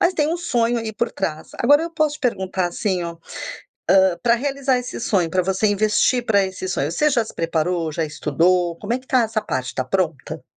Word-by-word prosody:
Mas 345 - +3
tem 300 -1 +1
um 335 - 0
sonho 240 -8 0
aí 220 -1 -4
por 235 +2 -1
trás. 160 -5 -4
Agora 290 +6 +5
eu 335 - -4
posso 310 -2 0
te - - -28
perguntar 190 -7 -1
assim 185 0 -1
ó: 170 0 -5 0.7
hã, 190 -2 +5
para 235 - +4
realizar 270 0 0
esse 250 - -6
sonho, 185 -7 +1
pra 185 +2 +1
você 190 +3 +1
investir 215 +4 +2
para 200 -3 +3
esse 185 0 -6
sonho, 155 -4 -1
você 300 - +2
já 235 -3 +2
se - - -10
preparou, 165 0 -1
já 160 +2 -2
estudou? 170 +4 +1
Como 210 +2 -5
é - - +1
que 260 - -22
está 255 -2 +3
essa 220 -1 -1
parte, 130 0 -3
tá 130 - 0
pronta? 165 -2 -2
200 Hz, 220 wpm, -21 LUFS, 175-245 Hz, 0.7 s, Agora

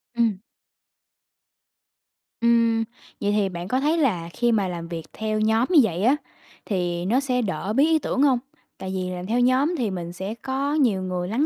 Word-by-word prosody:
Ừm. 230 -5 +1 2.0
Ừm. 230 -1 +3 0.4
Vậy 205 - +1
thì 205 -2 +1
bạn 175 0 -6
có 255 +4 +1
thấy 305 +4 +1
là 185 - 0
khi 240 -1 +1
mà 205 -4 +2
làm 170 -1 -5
việc 165 -2 -6
theo 215 0 -2
nhóm 220 +3 +2
như 330 - +7
vậy 185 -3 -1
á 255 +6 +5 0.5
thì 175 -3 -1
nó 235 +7 +2
sẽ 255 -2 0
đỡ 195 0 -2
bí 275 +5 +4
ý 320 -1 +3
tưởng 270 - -1
hông? 270 -4 +4 0.4
Tại 190 0 -5
vì 185 -1 -2
làm 180 0 -5
theo 230 +5 0
nhóm 260 +7 +3
thì 230 -7 -1
mình 175 -2 -5
sẽ 190 +4 -5
có 270 +2 -1
nhiều 240 -11 +2
người 180 -1 -3
lắng 235 +10 +1
220 Hz, 195 wpm, -24 LUFS, 185-255 Hz, 2.0 s, như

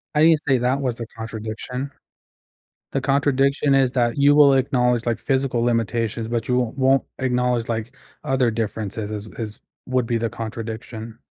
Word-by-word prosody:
I 150 - +5
didn't 160 -2 +6
say 135 -2 +4
that 130 +3 +1
was 125 -3 -1
the 115 - -6
contradiction. 115 +4 -5 1.0
The 135 - 0
contradiction 140 +1 +2
is 130 -2 +3
that 120 -1 +1
you 145 +1 +5
will 145 -2 +7
acknowledge, 125 -3 +1
like, 115 -1 0
physical 130 -3 0
limitations, 115 -1 0
but 120 0 -2
you 125 - +2
won't 125 +2 -2
won't 135 0 +3
acknowledge, 125 -2 0
like, 115 +3 -3 0.3
other 130 -3 +2
differences 110 -1 -3
as 105 0 -5
as 110 -2 -6 0.3
would 130 -2 0
be 115 -1 0
the 115 0 -1
contradiction. 110 0 -6
125 Hz, 165 wpm, -22 LUFS, 115-135 Hz, 1.0 s, will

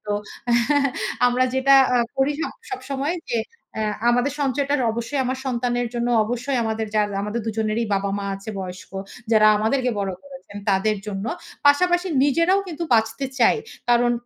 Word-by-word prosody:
তো 205 - -1 1.1
আমরা 250 +1 +3
যেটা 270 +1 +5 0.2
আ - - +4 0.2
করি 275 +2 +3 0.4
সবসময় 285 -2 -3
যে 235 - +1 0.4
এ্যা 220 - 0 0.2
আমাদের 245 +3 +1
সঞ্চয়টা 280 +1 0 0.2
অবশ্যই 235 +5 -2
আমার 260 +1 -2
সন্তানের 245 -1 -1
জন্য 240 0 -1 0.2
অবশ্যই 245 +4 -2
আমাদের 220 0 -2
যা 210 - +5 0.4
দুজনেরই 220 +1 -1
বাবা-মা 200 0 -1
আছে 195 +3 -7
বয়স্ক 185 0 -8 0.4
যারা 215 -1 +6
আমাদেরকে 250 +4 +1
বড় 195 -1 -1
করেছেন 270 -7 -11
তাদের 205 +2 +2
জন্য। 195 0 -4 0.4
পাশাপাশি 350 +5 +4 0.2
নিজেরাও 335 +7 +3
কিন্তু 335 0 -4
বাঁচতে 225 +4 +1
চাই। 230 - +5 0.3
কারণ 240 0 +4
245 Hz, 140 wpm, -22 LUFS, 220-275 Hz, 1.1 s, যারা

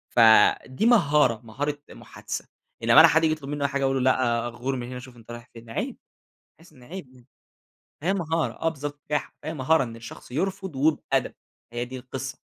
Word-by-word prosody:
فدي 120 - +5
مهارة، 150 - +4
مهارة 145 +6 -3
محادثة.أنما - - +2
حد 160 +1 +3
ييجي 155 - +3
يطلب 140 -2 -10
مني 145 -1 -1
حاجة 140 -1 -2
أقول 135 -1 +1
له: 130 - +6
"لأ، 120 -2 0
غور 125 +3 -3
من 120 -1 -5
هنا، 125 0 -6
شوف 125 -1 -13
أنت 115 +1 -13
رايح 120 +1 -10
فين." 115 0 -13
عيب 115 - -4 0.6
تحس 165 -1 -19
إن 125 - -17
عيب 155 0 -9
يعني. 125 0 -20 0.8
هي 190 +3 +2
مهارة 165 -3 -1
آه، 165 - +2
بالضبط. 145 -1 -7
بجاحة. 150 0 -3
فهي 160 - -4
مهارة 150 +1 +2
إن 115 -2 -7
الشخص 115 +1 -11
يرفض 190 +2 -3
وبأدب، 150 +3 +1 0.4
هي 120 +1 -2
دي 130 +1 -8
القصة. 130 +1 -6
135 Hz, 180 wpm, -25 LUFS, 120-155 Hz, 0.8 s, له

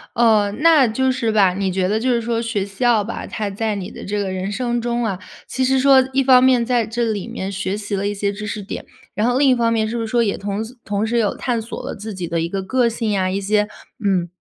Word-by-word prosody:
哦， 215 -3 +4
那 315 -6 +6
就 260 +4 +1
是 240 -4 -1
吧， 195 -4 +4
你 190 -1 -1
觉 185 0 0
得 215 +2 +1
就 255 +2 0
是 240 - +2
说 230 0 -1
学 215 -4 -2
校 215 +2 +1
吧， 230 - -6
它 210 -2 -3
在 215 +1 -2
你 195 +1 -6
的 - - -9
这 210 +1 -3
个 195 -2 -2
人 190 +2 -3
生 240 +1 -1
中 240 0 -1
啊， 195 -4 -2 0.3
其 260 - -2
实 265 +1 +3
说 265 -1 +6
一 270 +1 +2
方 255 -1 +6
面 250 -3 +4
在 240 -3 +1
这 235 +2 -2
里 215 -4 -2
面 190 +1 -5
学 195 +1 -2
习 205 -1 -4
了 200 +1 -1
一 205 - -2
些 200 0 -1
知 210 +1 -6
识 205 0 -4
点， - - -6 0.3
然 215 +3 0
后 245 +1 +2
另 280 - +4
一 260 - +6
方 230 -1 +1
面 220 -1 +1
是 235 - -4
不 230 - -1
是 225 - -3
说 235 +1 +2
也 200 - 0
同 200 +2 -3
时 245 - -12
同 205 +1 -1
时 235 +1 0
有 210 -3 0
探 240 -3 -1
索 230 - -7
了 - - -4
自 215 -1 -7
己 175 -2 -4
的 165 0 -1
一 165 - -2
个 195 0 -3
个 245 +3 +2
性 225 -1 -2
呀， 190 -2 +1
一 195 +1 -1
些， 210 +1 +1 0.4
嗯 185 -3 +1
220 Hz, 300 characters per minute, -20 LUFS, 200-240 Hz, 0.4 s, 那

